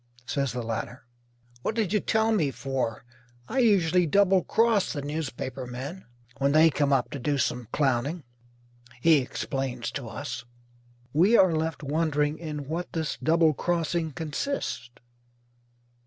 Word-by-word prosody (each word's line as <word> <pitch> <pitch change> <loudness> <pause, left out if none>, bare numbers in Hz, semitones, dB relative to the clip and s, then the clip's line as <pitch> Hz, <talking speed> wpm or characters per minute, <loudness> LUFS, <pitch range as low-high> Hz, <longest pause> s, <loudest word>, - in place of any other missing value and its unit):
says 140 -1 -1
the 125 -1 -4
latter. 115 +2 -5 0.6
"What 215 - -2
did 215 -4 0
you 210 - +4
tell 220 +1 +1
me 170 -10 +2
for? 130 -3 -3 0.4
I 265 - -1
usually 180 -7 +4
double 190 +2 +4
cross 225 -3 +2
the 145 -3 -4
newspaper 135 -3 -4
men 135 +10 -7 0.3
when 140 +1 +2
they 160 +1 +6
come 145 -1 +1
up 135 -3 +2
to 140 - -5
do 145 +3 0
some 125 -2 -1
clowning," 140 +3 0 0.8
he 160 +4 +6
explains 130 -1 -3
to 135 -3 -5
us. 145 +5 -5 0.7
We 190 +10 +5
are 185 -3 +5
left 160 0 -2
wondering 150 0 0
in 150 -4 -5
what 170 +4 -4
this 160 -2 -2
double 160 0 +4
crossing 170 0 -1
consists. 160 - -3
150 Hz, 140 wpm, -27 LUFS, 135-175 Hz, 0.8 s, they